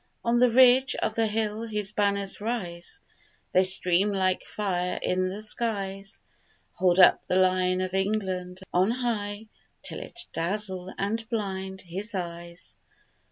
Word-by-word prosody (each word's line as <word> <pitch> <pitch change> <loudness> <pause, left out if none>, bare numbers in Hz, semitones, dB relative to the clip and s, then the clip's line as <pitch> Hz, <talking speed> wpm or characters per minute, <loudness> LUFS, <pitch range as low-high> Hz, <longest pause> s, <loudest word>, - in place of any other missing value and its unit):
On 235 +1 +3
the 250 0 +6
ridge 260 +2 +6
of 220 - -1
the 225 0 +1
hill 215 0 -1
his 210 -3 -2
banners 200 -1 0
rise; 205 - -4 0.5
They 185 - +5
stream 185 +1 +3
like 185 -2 +1
fire 180 -3 -2
in 185 0 0
the 205 +3 -5
skies; 200 -3 -3 0.5
Hold 180 0 +2
up 180 - +6
the - - 0
Lion 185 0 +3
of 185 0 -3
England 190 -2 -1
on 185 +3 +3
high 220 -4 -2 0.4
Till - - -5
it 350 0 -6
dazzle 185 0 -2
and 220 +3 -2
blind 190 -4 -3
his 195 +5 -5
eyes. 170 -1 -6
195 Hz, 140 wpm, -27 LUFS, 185-215 Hz, 0.5 s, the